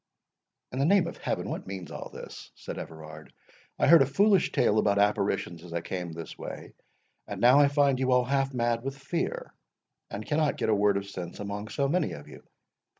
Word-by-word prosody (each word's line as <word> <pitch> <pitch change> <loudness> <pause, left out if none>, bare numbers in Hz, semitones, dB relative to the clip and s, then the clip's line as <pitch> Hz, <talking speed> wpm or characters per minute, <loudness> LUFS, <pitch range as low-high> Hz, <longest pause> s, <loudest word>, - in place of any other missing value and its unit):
"In 130 - -4
the 140 - +3
name 190 +1 +4
of 170 - -6
Heaven, - - -3
what - - -5
means 95 -4 -7
all - - -7
this?" - - -10
said - - -7
Everard. 80 -1 -10 0.5
"I - - +2
heard 170 -3 +8
a 135 - +4
foolish 195 +5 +3
tale 110 - +3
about 100 -1 +2
apparitions 100 -4 0
as 85 -2 -10
I 85 - -1
came 90 -1 -5
this 80 0 -8
way, - - -8 0.5
and - - -6
now 125 +4 +6
I 145 - +6
find 140 -2 +2
you 130 -1 +1
all 125 0 +4
half 135 +1 0
mad 120 -2 0
with 135 +2 -5
fear, 140 +5 -3 0.6
and 105 +2 -6
cannot 150 -1 +1
get - - -1
a 110 - +4
word 100 -1 +3
of 100 0 -4
sense 90 -3 -7
among 105 +1 -5
so 140 +6 -1
many 170 +3 0
of 75 - -10
you. - - -12
120 Hz, 210 wpm, -28 LUFS, 100-140 Hz, 0.6 s, heard